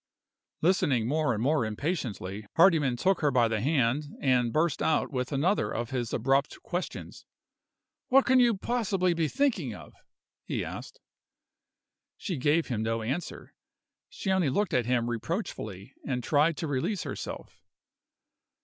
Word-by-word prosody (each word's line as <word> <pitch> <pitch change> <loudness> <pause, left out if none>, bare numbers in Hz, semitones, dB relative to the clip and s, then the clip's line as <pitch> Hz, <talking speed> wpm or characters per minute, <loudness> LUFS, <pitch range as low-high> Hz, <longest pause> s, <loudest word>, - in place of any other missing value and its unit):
Listening 145 - +2
more 150 +1 +1
and 110 -1 -1
more 145 0 +2
impatiently, 110 - -3
Hardyman 160 -8 +4
took 190 +8 +1
her 150 - +3
by 125 -3 +3
the 110 -2 -1
hand, 140 +1 +1
and 125 -3 +2
burst 155 +1 +1
out 160 - +1
with 125 0 -2
another 145 - +1
of 120 +1 -3
his 120 -3 -2
abrupt 135 +2 +1
questions. 175 +1 -5 0.8
"What 270 +1 +5
can 260 0 +5
you 235 -4 +4
possibly 195 -6 0
be 165 -2 0
thinking 210 - 0
of?" - - -12 0.5
he - - -3
asked. - - -8 1.2
She 180 - -4
gave 150 +5 +2
him 115 -5 -2
no 115 0 -1
answer; 140 +10 -5 0.6
she 195 - -3
only 185 -6 +2
looked 205 +10 0
at 125 -2 +1
him 120 -2 +1
reproachfully, 115 - -4
and 125 -3 -2
tried 150 +3 +2
to 165 - -3
release 145 +6 -1
herself. - - -7
145 Hz, 145 wpm, -28 LUFS, 120-175 Hz, 1.2 s, What